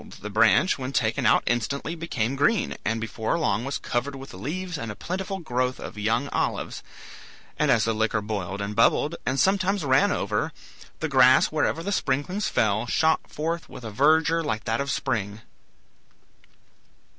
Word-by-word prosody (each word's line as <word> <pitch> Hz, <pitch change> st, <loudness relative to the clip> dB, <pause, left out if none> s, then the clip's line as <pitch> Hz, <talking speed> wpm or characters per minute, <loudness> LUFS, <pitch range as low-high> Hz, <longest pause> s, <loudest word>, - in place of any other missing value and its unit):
the 105 Hz, -, -6 dB
branch 115 Hz, -, +4 dB
when 130 Hz, 0 st, -4 dB
taken 115 Hz, -4 st, +1 dB
out -, -, +4 dB
instantly 140 Hz, +6 st, -1 dB
became 135 Hz, -7 st, -2 dB
green, 175 Hz, +9 st, +1 dB
and 115 Hz, +1 st, -1 dB
before 110 Hz, +5 st, -2 dB
long 120 Hz, -9 st, 0 dB
was 140 Hz, +1 st, -2 dB
covered 130 Hz, +4 st, -2 dB
with 135 Hz, 0 st, -10 dB
leaves 175 Hz, -, -4 dB
and 115 Hz, -7 st, -4 dB
a -, -, -8 dB
plentiful 190 Hz, -, -4 dB
growth 130 Hz, -6 st, -2 dB
of -, -, -8 dB
young 115 Hz, +6 st, 0 dB
olives; -, -, -2 dB, 0.8 s
and 150 Hz, -, +2 dB
as 115 Hz, -5 st, +4 dB
the 115 Hz, -, +1 dB
liquor 110 Hz, 0 st, 0 dB
boiled 100 Hz, -2 st, -4 dB
and 100 Hz, +1 st, -4 dB
bubbled, 145 Hz, +7 st, +3 dB
and 130 Hz, +1 st, 0 dB
sometimes 195 Hz, -2 st, +2 dB
ran 130 Hz, 0 st, +4 dB
over, -, -, -1 dB, 0.5 s
the -, -, 0 dB
grass -, -, +5 dB
wherever 165 Hz, -, 0 dB
the 200 Hz, -, -2 dB
sprinklings 180 Hz, +5 st, -1 dB
fell 110 Hz, +2 st, +1 dB
shot 160 Hz, +4 st, +3 dB
forth 165 Hz, +2 st, -4 dB
with 125 Hz, -, -10 dB
a 110 Hz, -, -6 dB
verdure 160 Hz, +7 st, +3 dB
like 110 Hz, -7 st, -2 dB
that 115 Hz, +3 st, -1 dB
of 140 Hz, -, -3 dB
spring. 105 Hz, -4 st, -2 dB
130 Hz, 170 wpm, -25 LUFS, 110-160 Hz, 0.8 s, grass